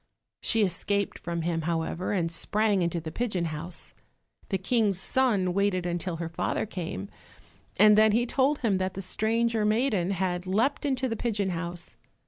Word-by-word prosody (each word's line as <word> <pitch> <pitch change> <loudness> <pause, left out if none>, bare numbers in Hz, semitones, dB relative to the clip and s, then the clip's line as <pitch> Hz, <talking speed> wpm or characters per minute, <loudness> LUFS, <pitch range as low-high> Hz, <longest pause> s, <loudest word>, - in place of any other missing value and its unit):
She 225 -1 +3
escaped 200 +2 -1
from 170 -1 -3
him, 165 -1 -1
however, 165 +2 -2
and 170 -5 0
sprang 205 +4 +1
into 170 0 0
the 160 -1 -6
pigeon 205 -7 -1
house. 165 +2 -6 0.6
The 195 - +1
King's 200 -1 +1
son 205 -6 +1
waited 195 -2 +1
until 175 0 -2
her 165 0 -4
father 165 - -1
came, 170 - -5 0.7
and 210 +2 +7
then 215 0 +6
he 235 +3 +2
told 275 +4 +2
him 205 -6 +1
that 185 0 -2
the 195 - -5
stranger 225 +3 0
maiden 215 -4 +1
had 185 -1 -1
leapt 225 +11 +1
into 260 -1 0
the 225 - -2
pigeon 205 -4 -1
house. 175 0 -5
195 Hz, 165 wpm, -27 LUFS, 175-220 Hz, 0.7 s, and